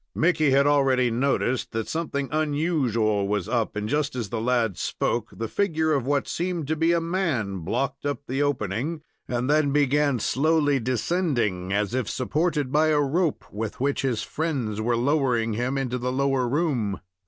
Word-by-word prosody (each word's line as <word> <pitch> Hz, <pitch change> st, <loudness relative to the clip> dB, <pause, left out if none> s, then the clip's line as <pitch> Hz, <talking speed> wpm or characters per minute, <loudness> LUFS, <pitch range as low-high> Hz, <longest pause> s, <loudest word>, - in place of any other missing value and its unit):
Mickey 155 Hz, -3 st, +3 dB
had 135 Hz, +1 st, +4 dB
already 135 Hz, -4 st, +3 dB
noticed 130 Hz, 0 st, 0 dB
that 110 Hz, -1 st, -2 dB
something 150 Hz, -4 st, -2 dB
unusual 145 Hz, -, +1 dB
was 105 Hz, -3 st, -1 dB
up, 115 Hz, -3 st, -1 dB
and, 105 Hz, 0 st, -2 dB
just 145 Hz, +2 st, 0 dB
as 115 Hz, -5 st, -3 dB
the 115 Hz, -2 st, -3 dB
lad 115 Hz, -4 st, +1 dB
spoke, 120 Hz, +5 st, -2 dB
the 115 Hz, -, -4 dB
figure 160 Hz, -, +1 dB
of 135 Hz, -3 st, 0 dB
what 140 Hz, -1 st, +1 dB
seemed 175 Hz, -2 st, -2 dB
to 155 Hz, -, 0 dB
be 165 Hz, +2 st, +2 dB
a 170 Hz, -, +3 dB
man 160 Hz, -, -1 dB
blocked 135 Hz, +11 st, -2 dB
up 145 Hz, 0 st, -2 dB
the 135 Hz, +3 st, -2 dB
opening, 145 Hz, -, -1 dB, 0.2 s
and 125 Hz, 0 st, -1 dB
then 150 Hz, -1 st, +3 dB
began 145 Hz, -1 st, +2 dB
slowly 145 Hz, +3 st, +2 dB
descending, 120 Hz, -, -1 dB
as 105 Hz, +2 st, 0 dB
if 130 Hz, -4 st, -1 dB
supported 145 Hz, +1 st, -1 dB
by 155 Hz, +2 st, +3 dB
a 155 Hz, -1 st, +3 dB
rope, 155 Hz, +3 st, 0 dB
with 105 Hz, +1 st, -4 dB
which 140 Hz, +2 st, 0 dB
his 125 Hz, -5 st, -1 dB
friends 130 Hz, -10 st, -2 dB
were 120 Hz, +1 st, +1 dB
lowering 125 Hz, -4 st, +1 dB
him 125 Hz, +5 st, -1 dB
into 125 Hz, -2 st, -2 dB
the 125 Hz, +1 st, -2 dB
lower 135 Hz, -1 st, +1 dB
room. 130 Hz, -, 0 dB
135 Hz, 175 wpm, -25 LUFS, 115-150 Hz, 0.2 s, had